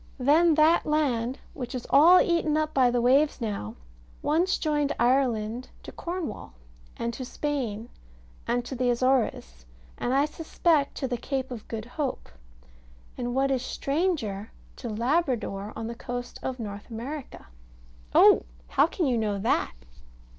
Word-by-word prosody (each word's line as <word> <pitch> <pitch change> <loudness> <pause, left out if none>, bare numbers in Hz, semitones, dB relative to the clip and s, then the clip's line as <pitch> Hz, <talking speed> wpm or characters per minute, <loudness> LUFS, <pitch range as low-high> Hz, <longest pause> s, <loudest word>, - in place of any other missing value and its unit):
Then 305 +5 +4
that 315 +2 +4
land, 265 -5 0 0.2
which 250 -2 -6
is 250 - -5
all 335 +6 +8
eaten 330 -3 +2
up 310 0 -1
by 255 -2 +4
the 245 0 +1
waves 280 +5 +3
now, 200 - -4 0.5
once 340 +5 +2
joined 295 -2 0
Ireland 240 -2 +1
to - - -8
Cornwall, 340 - -5 0.4
and 235 0 -2
to 260 - -6
Spain, 245 -5 -3 0.6
and 240 +1 0
to - - -6
the 250 -1 0
Azores, 235 - 0 0.3
and 245 - -1
I 275 +2 +3
suspect 310 -1 0
to 265 - -2
the 245 -1 -2
Cape 265 +1 -3
of 230 -4 -7
Good 220 -1 -5
Hope, 265 +2 -4 0.9
and 245 0 -3
what 275 +1 +2
is 260 -2 +1
stranger, 275 - -2 0.3
to 240 - -6
Labrador, 230 - -1
on 225 - -5
the 230 - -4
coast 245 +1 -6
of 260 -1 -3
North 205 -1 -7
America. 255 +5 -7 0.7
Oh! - - +7 0.2
How - - +4
can 340 0 -2
you 245 -4 +1
know 210 -2 -1
that? 200 - 0
255 Hz, 150 wpm, -27 LUFS, 230-295 Hz, 0.9 s, all